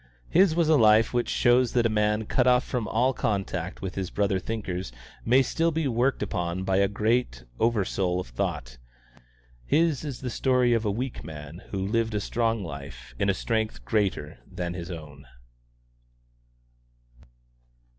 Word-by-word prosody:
His 175 Hz, -1 st, +5 dB
was 170 Hz, -2 st, +2 dB
a 155 Hz, -1 st, +5 dB
life 110 Hz, -1 st, +5 dB
which 120 Hz, -1 st, 0 dB
shows 120 Hz, 0 st, +3 dB
that 120 Hz, -2 st, +2 dB
a 110 Hz, -2 st, +1 dB
man 105 Hz, +1 st, -1 dB
cut 125 Hz, +3 st, +1 dB
off 125 Hz, +1 st, +5 dB
from 120 Hz, -4 st, -3 dB
all 125 Hz, +4 st, +2 dB
contact 95 Hz, -6 st, -3 dB
with 95 Hz, -1 st, -4 dB
his 95 Hz, -2 st, -3 dB
brother 100 Hz, -2 st, 0 dB
thinkers 95 Hz, -, -4 dB, 0.3 s
may 130 Hz, +4 st, +4 dB
still 165 Hz, +6 st, +1 dB
be 160 Hz, -2 st, -1 dB
worked 125 Hz, +2 st, +1 dB
upon 90 Hz, 0 st, -2 dB
by 95 Hz, 0 st, +1 dB
the 100 Hz, -, +4 dB
great 105 Hz, -, 0 dB, 0.2 s
over 115 Hz, -4 st, +2 dB
soul 90 Hz, -2 st, -1 dB
of 90 Hz, -, -4 dB
thought: -, -, -4 dB, 0.8 s
his 155 Hz, -, +1 dB
is 140 Hz, -5 st, -6 dB
the 125 Hz, -2 st, -4 dB
story 125 Hz, -1 st, +2 dB
of 115 Hz, -1 st, 0 dB
a -, -, +1 dB
weak 125 Hz, +5 st, -4 dB
man 80 Hz, +2 st, -9 dB
who 100 Hz, -, -4 dB
lived 115 Hz, +1 st, 0 dB
a -, -, +1 dB
strong 115 Hz, 0 st, -1 dB
life 70 Hz, -6 st, -9 dB
in 100 Hz, -, +2 dB
a 100 Hz, -, +2 dB
strength 110 Hz, -, -2 dB
greater 105 Hz, -3 st, -1 dB
than 90 Hz, -1 st, -4 dB
his 85 Hz, 0 st, -6 dB
own. 75 Hz, -5 st, -9 dB
110 Hz, 165 wpm, -26 LUFS, 90-125 Hz, 0.8 s, His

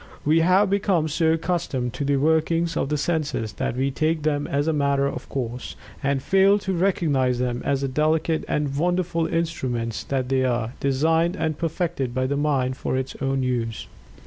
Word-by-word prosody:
We 155 Hz, +3 st, +4 dB
have 185 Hz, +5 st, +4 dB
become 195 Hz, -5 st, +1 dB
so 160 Hz, +1 st, +2 dB
accustomed 160 Hz, -8 st, -2 dB
to 130 Hz, -, -3 dB
the 140 Hz, 0 st, +1 dB
workings 160 Hz, +3 st, +1 dB
of -, -, -1 dB
the 150 Hz, -, 0 dB
senses 145 Hz, -8 st, -1 dB
that 115 Hz, -, -2 dB
we 135 Hz, +1 st, +1 dB
take 155 Hz, +2 st, 0 dB
them 145 Hz, -1 st, 0 dB
as 145 Hz, +2 st, 0 dB
a 160 Hz, -, +2 dB
"matter 140 Hz, -1 st, +1 dB
of 140 Hz, -, -4 dB
course," 125 Hz, -2 st, -4 dB, 0.3 s
and 135 Hz, -1 st, 0 dB
fail 195 Hz, +3 st, +4 dB
to 190 Hz, -2 st, -3 dB
recognize 155 Hz, -9 st, +1 dB
them 125 Hz, -1 st, -1 dB
as 140 Hz, -1 st, 0 dB
the 135 Hz, -, 0 dB
delicate 155 Hz, +3 st, +1 dB
and 145 Hz, -2 st, -1 dB
wonderful 170 Hz, +1 st, 0 dB
instruments 130 Hz, -10 st, -2 dB
that 130 Hz, -2 st, -1 dB
they 135 Hz, -1 st, +2 dB
are 120 Hz, -2 st, -1 dB
designed 160 Hz, +5 st, +2 dB
and 155 Hz, -1 st, -2 dB
perfected 160 Hz, -6 st, -2 dB
by 130 Hz, 0 st, +1 dB
the 140 Hz, +2 st, -1 dB
mind 135 Hz, -3 st, 0 dB
for 130 Hz, -, -2 dB
its 130 Hz, 0 st, -3 dB
own 135 Hz, -1 st, 0 dB
use. 115 Hz, -3 st, -2 dB
145 Hz, 185 wpm, -24 LUFS, 130-165 Hz, 0.3 s, We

